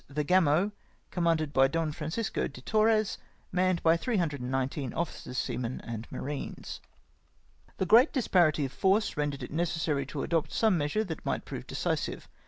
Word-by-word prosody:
the 150 Hz, +1 st, -2 dB
Gamo, 180 Hz, +2 st, +3 dB, 0.4 s
commanded 165 Hz, -4 st, +1 dB
by 135 Hz, 0 st, +5 dB
Don 165 Hz, +2 st, -1 dB
Francisco 160 Hz, +8 st, -2 dB
de 135 Hz, -, -11 dB
Torres, 215 Hz, -, +2 dB, 0.3 s
manned 185 Hz, -1 st, +1 dB
by 165 Hz, 0 st, +5 dB
319 140 Hz, -, -1 dB
officers, 165 Hz, -6 st, -4 dB
seamen, 125 Hz, 0 st, -2 dB
and 115 Hz, -1 st, -6 dB
marines. 145 Hz, 0 st, -5 dB, 0.5 s
" 60 Hz, +2 st, -33 dB
The 190 Hz, -, 0 dB
great 230 Hz, -, +6 dB
disparity 175 Hz, -, +3 dB
of 130 Hz, -, -5 dB
force 195 Hz, +7 st, +2 dB
rendered 145 Hz, -2 st, -2 dB
it -, -, -7 dB
necessary 160 Hz, -3 st, 0 dB
to 140 Hz, -1 st, -4 dB
adopt 165 Hz, -1 st, 0 dB
some 220 Hz, -4 st, +3 dB
measure 150 Hz, +7 st, 0 dB
that 165 Hz, -6 st, -6 dB
might -, -, -2 dB
prove -, -, -7 dB
decisive. -, -, -2 dB
160 Hz, 155 wpm, -29 LUFS, 140-185 Hz, 0.5 s, great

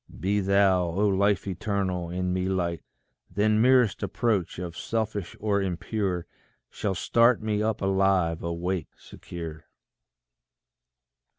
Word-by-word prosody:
Be 100 Hz, +2 st, +1 dB
thou, 95 Hz, -2 st, +3 dB
O 95 Hz, +5 st, +1 dB
Life 100 Hz, 0 st, +2 dB
eternal, 95 Hz, -2 st, -2 dB
in 90 Hz, +1 st, -2 dB
me 95 Hz, 0 st, -1 dB
light; 85 Hz, -4 st, -1 dB, 0.5 s
Then 105 Hz, +3 st, +2 dB
merest 125 Hz, -3 st, +4 dB
approach 110 Hz, -8 st, -1 dB
of 85 Hz, -2 st, -5 dB
selfish 105 Hz, +1 st, -3 dB
or 100 Hz, -2 st, +1 dB
impure 95 Hz, -1 st, -2 dB, 0.5 s
Shall 100 Hz, -3 st, -2 dB
start 115 Hz, +5 st, +3 dB
me 105 Hz, -1 st, 0 dB
up 110 Hz, -1 st, -1 dB
alive, 95 Hz, -4 st, +2 dB
awake, 85 Hz, 0 st, -2 dB
secure. 80 Hz, -2 st, -9 dB
95 Hz, 115 wpm, -26 LUFS, 90-105 Hz, 0.5 s, merest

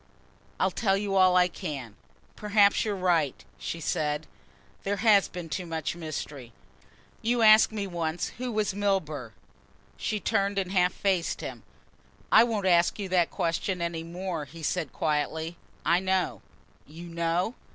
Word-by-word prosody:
"I'll 190 Hz, -, +2 dB
tell 195 Hz, 0 st, +1 dB
you 200 Hz, -1 st, -2 dB
all 185 Hz, -1 st, +5 dB
I 180 Hz, 0 st, +5 dB
can. 135 Hz, -, -6 dB, 0.4 s
Perhaps 205 Hz, -1 st, +3 dB
you're 210 Hz, -2 st, -1 dB
right," 170 Hz, -7 st, 0 dB
she 165 Hz, -, -4 dB
said. 150 Hz, -1 st, -1 dB, 0.6 s
"There 200 Hz, +1 st, -1 dB
has 205 Hz, -1 st, +4 dB
been 175 Hz, -2 st, -7 dB
too 180 Hz, +2 st, -4 dB
much 160 Hz, 0 st, -3 dB
mystery. 145 Hz, -6 st, -6 dB, 0.7 s
You 235 Hz, +1 st, +1 dB
asked 215 Hz, 0 st, +7 dB
me 210 Hz, -2 st, -3 dB
once 170 Hz, -2 st, -2 dB
who 250 Hz, -1 st, -3 dB
was 215 Hz, -3 st, 0 dB
Milburgh." 160 Hz, -, -1 dB, 0.6 s
She 215 Hz, -, -2 dB
turned 200 Hz, -2 st, 0 dB
and 190 Hz, -2 st, -1 dB
half 180 Hz, -1 st, +3 dB
faced 190 Hz, -4 st, 0 dB
him. -, -, -6 dB, 0.7 s
"I -, -, +8 dB
won't 220 Hz, -4 st, -1 dB
ask 175 Hz, -2 st, +4 dB
you 200 Hz, -3 st, -4 dB
that 180 Hz, -2 st, +3 dB
question 175 Hz, +2 st, -1 dB
any 170 Hz, -1 st, -2 dB
more," 170 Hz, -1 st, -4 dB
he 165 Hz, +4 st, -12 dB
said 160 Hz, -2 st, -1 dB
quietly, 160 Hz, +2 st, -1 dB, 0.3 s
"I 170 Hz, +2 st, +4 dB
know!" 185 Hz, -, 0 dB, 0.5 s
"You 165 Hz, +4 st, -10 dB
know?" 170 Hz, +5 st, -1 dB
180 Hz, 150 wpm, -28 LUFS, 160-200 Hz, 0.7 s, I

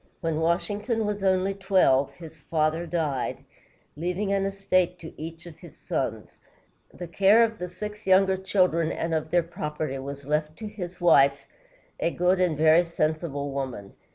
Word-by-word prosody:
When 165 Hz, -3 st, -1 dB
Washington 205 Hz, +7 st, 0 dB
was 205 Hz, -1 st, -3 dB
only 190 Hz, 0 st, +2 dB
twelve, 190 Hz, -9 st, +2 dB
his 160 Hz, -2 st, -12 dB
father 160 Hz, +2 st, 0 dB
died, 155 Hz, -6 st, -2 dB, 0.5 s
leaving 180 Hz, +6 st, -2 dB
an 195 Hz, -1 st, +1 dB
estate 185 Hz, -2 st, 0 dB
to 165 Hz, -2 st, -10 dB
each 165 Hz, +1 st, -8 dB
of 170 Hz, -3 st, -12 dB
his -, -, -13 dB
sons. -, -, -4 dB, 0.5 s
The 175 Hz, -, -8 dB
care 200 Hz, +6 st, +5 dB
of 225 Hz, -1 st, -1 dB
the 180 Hz, 0 st, -4 dB
six 210 Hz, +3 st, -8 dB
younger 190 Hz, 0 st, +5 dB
children 180 Hz, -4 st, +1 dB
and 165 Hz, 0 st, -3 dB
of 155 Hz, -1 st, -1 dB
their 175 Hz, 0 st, +3 dB
property 150 Hz, -4 st, -4 dB
was 140 Hz, +1 st, -7 dB
left 150 Hz, +1 st, -1 dB
to 220 Hz, -, -6 dB
his 185 Hz, -4 st, -7 dB
wife, 140 Hz, -5 st, +4 dB, 0.5 s
a -, -, +1 dB
good 180 Hz, +2 st, +1 dB
and 170 Hz, -5 st, +1 dB
very 160 Hz, +2 st, +5 dB
sensible 155 Hz, -3 st, -2 dB
woman. 130 Hz, -8 st, -5 dB
170 Hz, 160 wpm, -26 LUFS, 155-190 Hz, 0.5 s, care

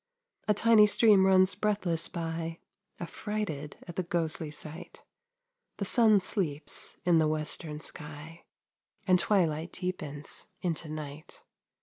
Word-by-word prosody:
A 210 Hz, -, +3 dB
tiny 220 Hz, 0 st, +6 dB
stream 205 Hz, -2 st, +5 dB
runs 185 Hz, 0 st, +5 dB
breathless 195 Hz, -6 st, -1 dB
by, 165 Hz, -1 st, -4 dB, 0.4 s
Affrighted 175 Hz, -5 st, -4 dB
at 175 Hz, -, -9 dB
the -, -, +2 dB
ghostly 165 Hz, -3 st, -2 dB
sight; 155 Hz, +2 st, -7 dB, 0.7 s
The 200 Hz, -, -2 dB
sun 215 Hz, 0 st, +5 dB
sleeps 165 Hz, -7 st, 0 dB
in 175 Hz, -2 st, +5 dB
the 155 Hz, -, +3 dB
western 155 Hz, 0 st, -3 dB
sky, 150 Hz, +3 st, -8 dB, 0.6 s
And 180 Hz, -1 st, +4 dB
twilight 170 Hz, -4 st, +1 dB
deepens 155 Hz, -6 st, -5 dB, 0.2 s
into 165 Hz, -2 st, -2 dB
night. 155 Hz, 0 st, -8 dB
170 Hz, 115 wpm, -30 LUFS, 155-195 Hz, 0.7 s, tiny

